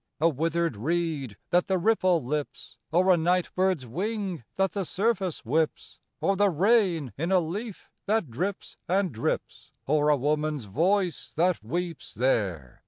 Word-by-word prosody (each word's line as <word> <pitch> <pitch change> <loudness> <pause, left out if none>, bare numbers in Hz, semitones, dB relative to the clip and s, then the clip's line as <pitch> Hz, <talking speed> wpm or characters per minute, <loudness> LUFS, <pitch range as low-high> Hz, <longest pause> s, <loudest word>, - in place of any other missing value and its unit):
A 160 - +4
withered 165 -2 0
reed, 150 - -2
that 175 0 +3
the 190 - +2
ripple 185 - +2
lips? 150 +2 -4
Or 185 +3 +5
a - - +3
night 175 +2 +1
bird's 185 -7 +1
wing, 190 - -3
that 195 -2 +1
the 195 +3 -2
surface 190 - -1
whips? 155 +6 -1 0.2
Or 195 - +1
the 205 +1 +3
rain 180 - +2
in 170 +4 -1
a 190 - +5
leaf 195 +6 -5 0.2
that 210 - +1
drips 185 - -4
and 185 0 +1
drips? 115 - -3
Or 150 +1 +2
a 150 - +4
woman's 150 -1 -1
voice 175 - 0
that 175 -5 +1
weeps 170 +7 -4
there? 100 - 0
170 Hz, 155 wpm, -27 LUFS, 150-190 Hz, 0.2 s, Or